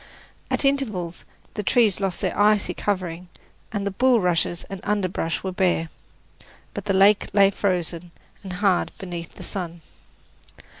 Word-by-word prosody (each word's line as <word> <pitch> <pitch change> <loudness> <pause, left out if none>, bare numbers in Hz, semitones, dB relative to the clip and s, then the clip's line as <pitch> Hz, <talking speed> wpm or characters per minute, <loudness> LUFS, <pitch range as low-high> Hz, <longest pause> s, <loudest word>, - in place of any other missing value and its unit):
At - - +1
intervals 215 -12 -1 0.3
the - - -3
trees 210 -1 +3
lost 195 -3 -2
their - - -1
icy 210 0 +3
covering, 180 -3 -3 0.4
and 205 -2 -2
the 200 - -1
bulrushes 190 -7 +2
and 195 -1 -8
underbrush 185 -5 -1
were 190 - -2
bare; 180 -3 +1 0.8
but - - -5
the 195 - +1
lake 200 +2 +5
lay 200 -1 +6
frozen 175 -3 -1 0.3
and 190 -2 -7
hard 195 -1 +1
beneath 175 -3 -7
the - - -9
sun. 175 -3 -5
190 Hz, 140 wpm, -24 LUFS, 175-205 Hz, 0.8 s, lay